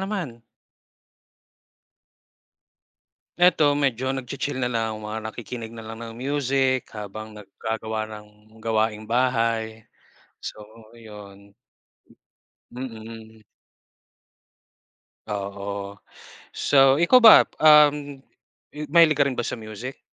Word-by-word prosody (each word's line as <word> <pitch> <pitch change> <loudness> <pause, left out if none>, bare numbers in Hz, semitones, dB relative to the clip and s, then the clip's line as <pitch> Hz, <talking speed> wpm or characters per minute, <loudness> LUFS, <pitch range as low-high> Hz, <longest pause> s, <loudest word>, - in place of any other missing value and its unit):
naman? 190 - -5 3.0
Eto, 165 -5 +4
medyo 130 -2 0
nagchi-chill 135 +1 -4
na 125 - 0
lang 115 -2 -2
mga 110 +1 -5
nakikinig 115 -1 -8
na 115 -1 -10
lang 110 +1 -8
ng 115 -1 -8
music, 135 -1 0
habang 110 +1 -8
nagagawa 110 +2 -5
ng 105 -1 -10 0.3
gawaing 110 -1 -1
bahay. 115 -2 -1 0.5
So 105 - -8 0.3
yun. 100 -3 -14 1.2
Mm. 115 -3 -9 1.9
Oo, 100 0 -6 0.6
so, 135 -1 +4
ikaw 170 - +5
ba, 230 -3 +9 0.2
uhm, 150 -2 +4 0.5
m 150 - -7
mahilig 160 -1 +5
ka 140 - +4
rin 130 - -3
ba 120 - -2
sa 115 - -4
music? 110 +4 -8
115 Hz, 95 wpm, -24 LUFS, 110-135 Hz, 3.0 s, ba